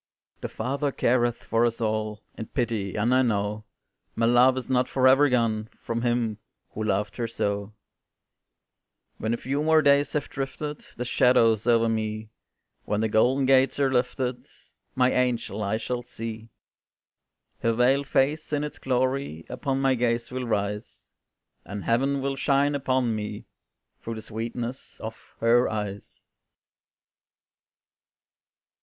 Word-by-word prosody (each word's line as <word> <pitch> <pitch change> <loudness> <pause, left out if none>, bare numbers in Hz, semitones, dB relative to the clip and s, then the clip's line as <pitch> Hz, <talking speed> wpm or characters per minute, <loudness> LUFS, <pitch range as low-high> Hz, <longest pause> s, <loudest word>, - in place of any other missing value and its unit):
The - - -5
Father 140 +2 -2
careth 120 -2 +1
for 115 +1 +1
us 115 -1 0
all 110 -1 -2
In 110 - -6
pity, 110 -6 -2
and 115 +4 +2
I 130 - +5
know 105 -2 -1 0.5
My 115 - +1
love 125 +2 +5
is 130 - -4
not 130 -1 +2
forever 135 +2 +5
gone 110 -3 0
From 115 0 -3
him 120 -3 0 0.3
who 110 - -4
loved 105 -1 -1
her 120 -2 -1
so; 100 -2 -2 1.5
When 110 - -1
a 120 - 0
few 140 +4 -2
more 160 0 +4
days 140 0 +4
have 150 - -1
drifted 145 +2 -5
Their 125 - -4
shadows 115 -3 +3
over 115 -1 +4
me, 110 -1 -2 0.5
When 105 0 -1
the 110 - +1
golden 125 +5 +3
gates 135 +1 +4
are 135 -2 +2
lifted, 125 0 -1 0.5
My 130 0 +3
angel 120 -4 0
I 105 +1 0
shall 120 +2 -3
see; 115 -1 -7 1.1
Her 115 - +1
veiled 130 +4 +2
face 150 +4 +1
in 145 -1 0
its 150 - -6
glory 130 - -1
Upon 135 -2 -2
my 135 -1 +3
gaze 120 -1 0
will 125 -1 -3
rise, 105 0 -3 0.5
And 100 0 -6
Heaven 135 +4 +1
will 135 0 -1
shine 140 +1 +2
upon 130 -4 0
me 105 -1 -5 0.6
Through 115 - -5
the 110 - -7
sweetness 115 +3 -6
of 110 0 -6 0.3
her 120 +2 +4
eyes. 105 -2 -6
120 Hz, 140 wpm, -26 LUFS, 110-130 Hz, 1.5 s, I